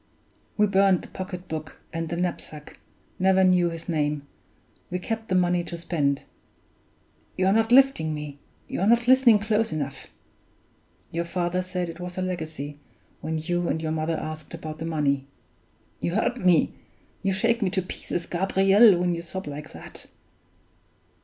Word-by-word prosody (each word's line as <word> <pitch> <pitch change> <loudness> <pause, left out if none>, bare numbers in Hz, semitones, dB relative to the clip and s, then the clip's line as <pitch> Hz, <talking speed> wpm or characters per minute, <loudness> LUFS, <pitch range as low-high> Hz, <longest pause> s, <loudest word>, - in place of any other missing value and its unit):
We 210 - +5
burned 195 -2 +3
the - - -11
pocket 185 -1 -6
book 155 -1 -6
and 165 0 -3
the 170 - -2
knapsack 170 -4 -5 0.4
never 190 0 +4
knew 180 -2 +4
his 165 0 -7
name 150 -3 -1 0.6
we 180 - -2
kept 225 +4 -4
the 185 - 0
money 180 -1 +2
to 170 - -6
spend. 150 -5 0 1.1
(You're 190 +1 +3
not 225 +1 +2
lifting 260 -12 +5
me; 150 -1 -7 0.3
you're 195 - -1
not 235 +1 +4
listening 255 -4 +7
close 215 0 0
enough!) 145 -3 -4 1.0
Your 170 +1 -2
father 175 +1 -1
said 185 -1 -3
it 165 +1 -8
was 180 0 -6
a 185 - 0
legacy, 160 -5 -5 0.4
when 160 0 -3
you 175 +2 -1
and 160 - 0
your 160 -1 -2
mother 160 +1 -1
asked 155 +1 -6
about 155 -1 -7
the 165 - -4
money. 140 -4 0 0.7
(You 170 - -2
hurt 245 +3 +1
me, 180 -2 +4 0.5
you 195 - +1
shake 230 +5 +1
me 195 - +2
to 190 0 -1
pieces, 175 -1 -4
Gabriel, 195 +3 +5
when 175 0 +1
you 170 - -3
sob 190 +3 -6
like 150 +1 -7
that.) - - -10
175 Hz, 160 wpm, -25 LUFS, 160-190 Hz, 1.1 s, listening